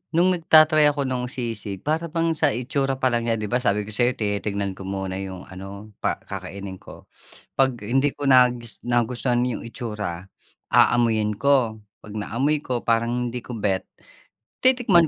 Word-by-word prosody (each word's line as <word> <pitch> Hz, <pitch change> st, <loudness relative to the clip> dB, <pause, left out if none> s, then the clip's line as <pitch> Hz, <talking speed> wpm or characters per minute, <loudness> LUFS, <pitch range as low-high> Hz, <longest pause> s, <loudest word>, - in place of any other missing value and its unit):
no'ng 180 Hz, +2 st, +4 dB
nagta-try 155 Hz, -1 st, +6 dB
ako 145 Hz, -1 st, +1 dB
no'ng 125 Hz, -1 st, -2 dB
sisig, 115 Hz, -6 st, -4 dB
para 160 Hz, +3 st, 0 dB
bang 165 Hz, +1 st, 0 dB
sa 150 Hz, -, +3 dB
itsura 135 Hz, +2 st, -1 dB
pa 130 Hz, -, +3 dB
lang 120 Hz, -1 st, 0 dB
niya- 115 Hz, -, +2 dB
'di 105 Hz, -, -3 dB
ba, 125 Hz, -, +2 dB
sabi 105 Hz, -4 st, +1 dB
ko 105 Hz, -, -9 dB
sayo 120 Hz, +4 st, +2 dB
tinitingnan 100 Hz, -2 st, -2 dB
ko 95 Hz, -, -8 dB
muna 95 Hz, -1 st, -3 dB
yung 95 Hz, -1 st, -6 dB
ano, 100 Hz, +3 st, -9 dB
pa -, -, -1 dB
kakainin 95 Hz, -1 st, -7 dB
ko- -, -, -14 dB, 0.5 s
'Pag 130 Hz, -5 st, +1 dB
hindi 135 Hz, +6 st, +2 dB
ko 145 Hz, -, -5 dB
nagus 125 Hz, -3 st, +3 dB
nagustuhan 120 Hz, +1 st, +1 dB
yung 125 Hz, -, -3 dB
itsura, 105 Hz, -7 st, -5 dB, 0.5 s
aamuyin 110 Hz, -3 st, +3 dB
ko. 130 Hz, -6 st, +2 dB, 0.2 s
'Pag 105 Hz, -, -11 dB
naamoy 130 Hz, +8 st, 0 dB
ko, 125 Hz, -2 st, -1 dB
parang 115 Hz, +1 st, +1 dB
hindi 125 Hz, -, -4 dB
ko -, -, -8 dB
bet, 100 Hz, -4 st, 0 dB, 0.8 s
titikman 235 Hz, -10 st, +5 dB
120 Hz, 165 wpm, -24 LUFS, 105-135 Hz, 0.8 s, nagta-try